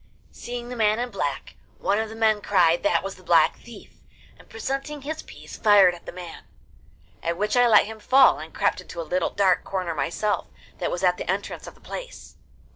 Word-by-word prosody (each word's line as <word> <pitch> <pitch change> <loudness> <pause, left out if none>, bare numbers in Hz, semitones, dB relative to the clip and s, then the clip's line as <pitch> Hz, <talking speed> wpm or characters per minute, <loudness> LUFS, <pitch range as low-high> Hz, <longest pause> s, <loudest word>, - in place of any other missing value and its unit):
Seeing 240 0 -7
the 250 - -6
man 215 -2 +2
in 245 +1 -3
black, 145 -8 -4 0.2
one 200 +2 0
of 220 0 -2
the 220 - -9
men 220 -2 +2
cried 175 -5 +3
that 305 - +1
was 195 -1 -6
the 185 - -17
Black 165 -2 +4
Thief, 235 -3 -14 0.4
and, - - -20
presenting 275 +5 -4
his 315 +2 -4
piece, - - -12
fired 200 -4 +6
at 175 - -13
the - - -5
man, 175 -2 -10 0.8
at 170 0 -2
which 210 +3 0
I 245 0 +5
let 215 -3 +6
him 220 +1 -9
fall, 260 - +5
and 160 +1 -9
crept - - 0
into 170 - -10
a - - -2
little 180 +2 -1
dark 190 -3 +2
corner 185 -3 -3
myself, 165 +8 -1 0.3
that 175 - -1
was 175 - -4
at 180 -1 +3
the - - -6
entrance 195 +2 -3
of - - -10
the - - -24
place. - - -9
205 Hz, 210 wpm, -24 LUFS, 175-235 Hz, 0.8 s, fired